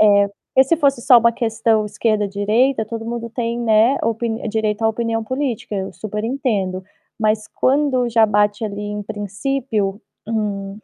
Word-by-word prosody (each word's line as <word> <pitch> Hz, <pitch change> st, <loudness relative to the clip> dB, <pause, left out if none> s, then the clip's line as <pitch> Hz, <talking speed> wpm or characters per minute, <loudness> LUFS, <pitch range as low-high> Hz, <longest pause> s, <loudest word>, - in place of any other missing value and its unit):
É. 200 Hz, -1 st, +5 dB, 0.3 s
E 265 Hz, -, +7 dB
se 330 Hz, +5 st, +2 dB
fosse 280 Hz, -5 st, +2 dB
só 245 Hz, 0 st, +7 dB
uma 235 Hz, 0 st, +3 dB
questão 225 Hz, -2 st, +1 dB
esquerda, 210 Hz, 0 st, 0 dB
direita, 220 Hz, +5 st, +1 dB
todo 225 Hz, +1 st, -6 dB
mundo 235 Hz, 0 st, -4 dB
tem, 235 Hz, 0 st, -2 dB
né, 230 Hz, +2 st, +3 dB
opin 225 Hz, 0 st, -1 dB, 0.2 s
direito 215 Hz, 0 st, -1 dB
à 220 Hz, -, +4 dB
opinião 225 Hz, 0 st, -2 dB
política, 255 Hz, -3 st, -3 dB
eu 190 Hz, -1 st, -3 dB
super 210 Hz, 0 st, -5 dB
entendo. 210 Hz, -8 st, -1 dB, 0.3 s
Mas 215 Hz, 0 st, 0 dB
quando 265 Hz, -2 st, +2 dB
já 225 Hz, -1 st, +5 dB
bate 210 Hz, 0 st, +1 dB
ali 205 Hz, -1 st, -4 dB
em 210 Hz, 0 st, -4 dB
princípio, 210 Hz, 0 st, -2 dB, 0.3 s
hum, 205 Hz, -3 st, -3 dB
220 Hz, 160 wpm, -20 LUFS, 210-235 Hz, 0.3 s, E